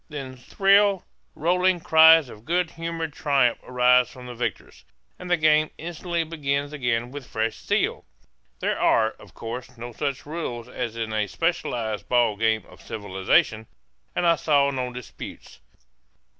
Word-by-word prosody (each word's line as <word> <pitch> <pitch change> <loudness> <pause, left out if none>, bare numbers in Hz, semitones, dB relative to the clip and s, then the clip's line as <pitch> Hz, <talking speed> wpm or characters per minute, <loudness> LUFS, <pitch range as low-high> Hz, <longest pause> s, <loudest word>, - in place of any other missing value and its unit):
Then 135 -4 -7
shrill, 195 +8 +3 0.3
rolling 180 +2 +2
cries 160 -2 +7
of 105 -3 -13
good 170 +4 0
humored 165 -2 -4
triumph 140 -6 +2
arise 125 0 +3
from 125 -1 -12
the 125 - -7
victors; 120 +1 -5 0.4
and 180 - -8
the 175 - +3
game 155 0 +3
instantly 170 +1 -3
begins 145 -3 -2
again 120 -3 -1
with 140 -2 -8
fresh 110 0 -2
zest. - - 0 0.6
There - - -1
are, 110 -1 +3
of - - -16
course, 120 +2 -7
no 120 +1 -7
such 140 +1 -3
rules 145 -7 -5
as 115 -2 -5
in 110 -1 -3
a 105 -1 0
specialized 120 - -2
ball 120 -4 +3
game 110 +1 0
of - - -17
civilization; 100 +2 0 0.5
and 175 - 0
I 170 -1 +4
saw 140 -2 +2
no 130 -2 -3
disputes. 125 - -10
135 Hz, 150 wpm, -24 LUFS, 120-165 Hz, 0.6 s, cries